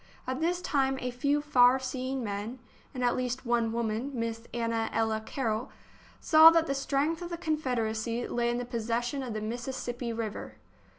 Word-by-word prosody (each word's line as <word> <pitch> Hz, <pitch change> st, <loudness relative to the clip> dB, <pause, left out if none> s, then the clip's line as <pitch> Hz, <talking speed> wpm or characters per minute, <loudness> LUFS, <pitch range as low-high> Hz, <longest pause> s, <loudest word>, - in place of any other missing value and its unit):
At 260 Hz, +1 st, -3 dB
this 350 Hz, +2 st, 0 dB
time 270 Hz, -2 st, +1 dB
a 250 Hz, -, -3 dB
few 285 Hz, +4 st, 0 dB
far 250 Hz, -3 st, +5 dB
seeing 260 Hz, 0 st, -3 dB
men, 210 Hz, +3 st, -4 dB, 0.3 s
and 250 Hz, -2 st, -4 dB
at 245 Hz, -, +3 dB
least 255 Hz, +1 st, -2 dB
one 235 Hz, -1 st, +1 dB
woman, 230 Hz, +2 st, -1 dB
Miss 230 Hz, -1 st, -2 dB
Anna 230 Hz, -1 st, -1 dB
Ella 220 Hz, -1 st, 0 dB
Carroll, 230 Hz, 0 st, -2 dB, 0.5 s
saw 315 Hz, 0 st, +8 dB
that 330 Hz, 0 st, +3 dB
the 275 Hz, -, -1 dB
strength 280 Hz, +4 st, 0 dB
of 350 Hz, -, -5 dB
the 340 Hz, -, -4 dB
Confederacy 240 Hz, -8 st, -1 dB
lay 240 Hz, 0 st, 0 dB
in 240 Hz, -, 0 dB
the 245 Hz, -, -3 dB
possession 240 Hz, +2 st, -2 dB
of 245 Hz, -4 st, -5 dB
the 215 Hz, -, -3 dB
Mississippi 240 Hz, +1 st, -4 dB
River. 225 Hz, -2 st, -5 dB
245 Hz, 175 wpm, -29 LUFS, 230-270 Hz, 0.5 s, saw